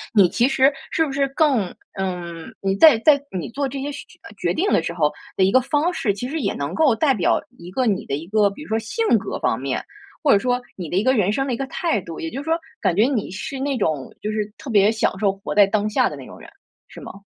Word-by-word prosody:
你 195 -5 +6
其 240 +7 +2
实 270 +1 +3 0.2
是 320 - +2
不 280 - -5
是 275 0 +1
更 270 - +1 0.2
嗯， 175 -3 -5
你 195 0 0
在 295 -1 +8
在 285 +2 +4 0.2
你 170 - -4
做 275 +3 -2
这 270 +1 -5
些 290 +1 -3
选 285 - -8 0.3
决 - - 0
定 385 +6 0
的 - - +3
时 170 +1 -4
候 150 -3 +1 0.2
的 190 - +2
一 190 - +4
个 260 - +6
方 295 +6 +1
式， 210 - 0
其 245 +6 -5
实 320 - -3
也 200 -8 -1
能 140 0 -4
够 290 -8 +3
代 270 +4 +3
表 190 - +1 0.2
一 170 +1 -10
个 255 +7 -1
你 205 -4 0
的 140 - -2
一 150 +3 -6
个 210 0 +3
比 200 - -11
如 - - -13
说 220 +1 +1
性 445 - -2
格 - - -5
方 - - 0
面， - - -3 0.4
或 285 - +4
者 200 - +6
说 250 +2 0 0.2
你 175 -5 -6
的 175 - -3
一 200 - +2
个 260 - +3
人 205 -5 +2
生 270 +3 0
的 255 - -2
一 - - -2
个 270 - -3
态 325 - -1
度。 165 -2 -9
也 165 - -3
就 270 +4 -5
是 - - -11
说 325 +1 +1 0.2
感 175 - +1
觉 210 - +4
你 250 -9 -1
是 260 +9 -6
那 275 -1 -1
种 155 - -2
就 215 - -2
是 210 -1 -3
特 285 - -9
别 205 -2 +5
享 220 -3 -1
受 200 -2 +2
活 195 0 -6
在 205 -1 +6
当 210 +1 0
下 215 - +2
的 - - -7
那 - - -10
种 - - -12
人， - - -13 0.4
是 - - -12
吗？ - - -9
220 Hz, 300 characters per minute, -22 LUFS, 195-275 Hz, 0.4 s, 在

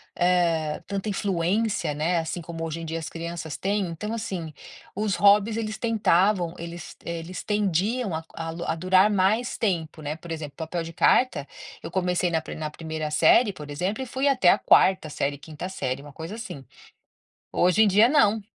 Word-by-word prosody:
eh, 170 -4 +1
tanta 200 +1 -3
influência, 200 0 0
né, 165 +4 0
assim 165 +2 -4
como 165 0 -6
hoje 165 0 -4
em 165 - -6
dia 165 +1 -3
as 160 - -5
crianças 165 -2 -5
têm. 200 -1 0
Então, 210 +7 -5
assim, 185 -8 -4 0.4
os 205 -1 0
hobbies 205 +2 +4
eles 215 -2 -3
tentavam 200 -6 +2
eles, 170 0 -8
eh, 170 0 -3
eles 175 +3 -7
tendiam 205 +1 0
a 160 - -4
a 165 0 -5
l 170 +1 -6
a - - 0
durar 185 +4 +4
mais 210 +5 +1
tempo, 165 -7 -2
né. 150 0 -3
Por 165 +1 -10
exemplo, 155 -3 -6
papel 165 +1 -4
de 165 0 -8
carta 170 - +3 0.4
eu 165 - -6
comecei 180 -1 +1
na 165 - +2
pri - - -8
na 155 -1 -4
1º 160 -1 -5
série, 205 +8 +5
por 150 -5 -10
exemplo, 185 - -2
e - - -3
fui 265 +3 0
até 255 -10 +2
a - - +6
4º 185 -4 +4
série, 145 -1 -2
5º 155 +4 -7
série, 135 -8 -3
uma 145 0 -12
coisa, 165 +7 -7
assim. 190 -11 -8 0.9
Hoje 180 +5 +4
em - - +6
dia 210 +4 +5
não, 220 -7 +3
175 Hz, 190 wpm, -25 LUFS, 160-205 Hz, 0.9 s, a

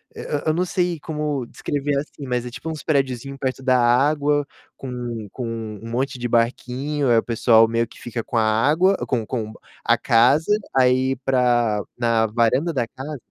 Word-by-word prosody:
e - - -9
e - - -7 0.2
eu 155 - +2
não 180 +3 +1
sei 175 -2 -1
como 150 -4 -3
descrever 145 0 -2
assim, 140 -1 -6
mas 125 -1 -1
é 125 - -6
tipo 160 +6 -7
uns 155 -2 -6
prediozinho 135 -3 -1
perto 130 0 -3
da 130 -1 +3
água, 145 +4 +2 0.3
com 135 - -8
um 120 -3 -5
com 130 - -6
um 115 -1 -6
monte 130 +2 -2
de 120 - -2
barquinho, 125 +4 0
aí 115 - +5
o - - +2
pessoal 115 -1 +4
meio 115 0 0
que 110 - -16
fica 120 -1 -5
com 120 - -3
a 110 - +4
água 145 - +3
com 115 -4 -1
com 110 -1 -4 0.3
a - - +3
casa, 130 - +3 0.3
aí 130 +1 +3
pra 120 -5 +2
na 115 -2 +2
varanda 120 +9 +1
da 125 -7 -1
casa 135 +6 -8
Hã? 145 - -5
125 Hz, 195 wpm, -22 LUFS, 115-145 Hz, 0.3 s, aí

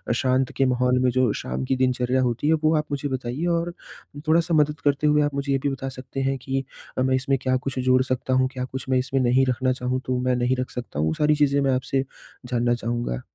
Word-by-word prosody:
शांत 130 +1 +1
के 135 - +3
माहौल 125 0 +2
में 125 - +4
जो 125 -3 +2
शाम 65 +1 -4
की 130 - 0
दिनचर्या 130 0 +1
होती 125 +3 0
है 160 - +5
वो 155 +1 +4
आप 150 - -1
मुझे 145 0 -2
बताइए 130 +4 -3
और 170 +1 -3 0.5
थोड़ा-सा 165 +1 +3
मदद 150 -1 +2
करते 145 +1 +2
हुए 150 0 +4
आप 145 -1 -1
मुझे 140 0 -2
ये 135 - +3
भी 140 - +2
बता 135 0 -4
सकते 130 +1 -6
हैं 135 - -1
कि 135 0 -2 0.3
अ, - - +1
मैं 130 0 +2
इसमें 135 +1 +1
क्या 130 0 +1
कुछ 130 0 -4
जोड़ 130 0 +3
सकता 130 0 -2
हूँ? 130 0 +3
क्या 125 -1 -3
कुछ 130 +1 -6
मैं 130 - +3
इसमें 130 +1 0
नहीं 130 +2 +3
रखना 130 +1 +1
चाहूँ 125 0 -2
तो 130 -1 0
मैं 125 0 +1
नहीं 125 +1 +1
रख 130 - -2
सकता 120 - -6
हूँ? 80 - +1
वो 80 - 0
सारी 150 - +2
चीज़ें 140 -1 +2
मैं 135 -1 +2
आपसे 135 +1 -1 0.4
जानना 120 -1 +1
चाहूँगा। 120 - -3
130 Hz, 245 wpm, -24 LUFS, 125-135 Hz, 0.5 s, है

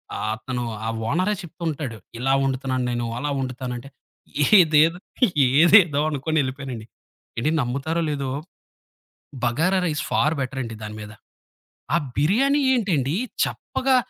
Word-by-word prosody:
ఆహ్, - - -3
అతను 125 +1 -4 0.2
ఆ - - -1 0.2
ఓనరే 185 +5 +1
చెప్తూ 170 +1 -10
ఉంటాడు. 140 -7 -4 0.2
ఇలా 135 +2 +1
వండుతున్నాను 130 -1 -1
నేను, 120 -1 -2
అలా 145 +3 -2
వండుతానంటే, 130 0 -5 0.7
ఏదేదు 160 +1 +5 0.6
ఏదేదో 170 -3 +6
అనుకొనెళ్ళిపోయానండి. 135 -5 -2 0.5
ఏండి, 150 +7 +1
నమ్ముతారో 140 +7 -2
లేదో, 140 -2 -3 1.2
బగారా 165 +11 +2
రైస్ 150 -2 -1
ఫార్ 155 +1 +2
బెటరండి 130 -3 -4
దాని 105 0 -6
మీద. 105 0 -9 0.8
ఆ - - +5 0.2
బిర్యానీ 265 - +3
ఏంటండి 165 - 0 0.3
చప్పగా, 265 0 -1
140 Hz, 115 wpm, -23 LUFS, 130-165 Hz, 1.2 s, ఏదేదో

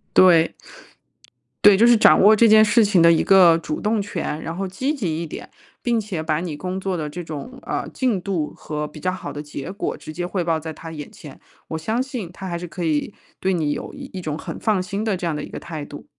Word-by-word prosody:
对。 170 -3 +6 1.1
对， 205 -2 +9
就 230 +4 +6
是 240 - +7
掌 220 - +6
握 210 +3 +7
这 230 - +5
件 215 -1 +7
事 220 +2 +4
情 200 -4 +3
的 170 - +7
一 165 - +4
个 180 -4 +6
主 310 - -4
动 215 0 0
权， 160 -5 -4
然 165 - -4
后 195 0 -2
积 260 +11 -2
极 170 - -2
一 - - -4
点， 155 - -8 0.3
并 240 -1 +1
且 205 -7 -3
把 155 0 -1
你 165 -5 -5
工 185 +4 -4
作 190 -1 -2
的 155 -2 -3
这 175 +4 -6
种， 160 - -7
呃， - - -3
进 240 -8 0
度 175 -6 -2
和 150 -1 -5
比 150 - -10
较 185 - -1
好 180 -6 -6
的 145 +1 -6
结 145 0 -7
果 195 - -3
直 - - -10
接 175 +3 -4
汇 180 -1 -2
报 165 -1 0
在 160 0 -6
他 165 +1 -9
眼 150 -2 -7
前， - - -13 0.3
我 160 - -3
相 220 +10 -1
信 250 -9 -6
他 190 0 -7
还 170 - -2
是 175 - -6
可 175 +1 -6
以 155 +5 -1 0.3
对 190 0 0
你 155 -4 0
有 - - -5
一 - - -9
一 190 - -6
种 155 -4 -4
很 - - -7
放 210 -5 +1
心 200 +4 -4
的 215 -3 +1
这 180 - -5
样 165 - 0
的 150 - -4
一 - - -7
个 - - -8
态 155 -3 -6
度。 145 - -11
180 Hz, 275 characters per minute, -22 LUFS, 160-205 Hz, 1.1 s, 对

